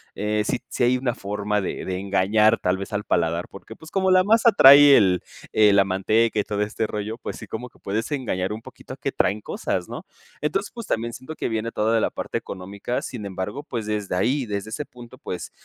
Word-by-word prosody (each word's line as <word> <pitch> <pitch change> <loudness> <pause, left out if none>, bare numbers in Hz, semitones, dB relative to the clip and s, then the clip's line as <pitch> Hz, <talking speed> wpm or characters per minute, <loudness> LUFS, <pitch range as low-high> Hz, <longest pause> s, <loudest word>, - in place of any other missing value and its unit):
eh, 105 +1 0
si - - 0
si - - -1
hay 125 +1 +3
una 125 -2 -2
forma 105 +1 -2
de 95 - -4
de 95 -1 -3
engañar 100 +3 +3
tal 90 0 0
vez 100 +3 -7
al 105 0 -1
paladar, 85 -1 0
porque, 105 +3 -11
pues, 160 +6 -14
como 190 -1 +1
la 185 0 +5
masa 225 +3 +4
trae 140 -3 +9
el 95 -6 +4 0.3
eh, 105 -2 +5
la 100 0 +6
manteca 110 +4 +1
y - - +2
todo 105 0 -3
este 105 +2 -1
rollo, 105 +1 -4
pues, - - -6
sí - - -10
como 125 +3 -6
que - - -26
puedes 110 +7 -3
engañar 105 -9 -2
un 110 - -7
poquito - - -11
a - - -10
que - - -3
traen 105 +2 0
cosas, 90 -3 -3
¿no? - - -7 0.4
Entonces, 195 +7 -1
pues, 235 -2 -7
también 115 -7 -2
siento 145 +7 -8
que - - -3
viene 115 0 -2
toda 110 +1 +1
de - - +4
la - - +1
parte - - -4
económica, 100 +5 -5
sin 115 -5 -6
embargo, 95 +8 -5
pues, 120 -7 -5
desde 105 -3 -2
ahí, 130 +9 +1
desde 100 -1 -4
ese 145 +7 -4
punto, 120 -1 -13
pues, 90 -9 -6
110 Hz, 230 wpm, -23 LUFS, 100-125 Hz, 0.4 s, trae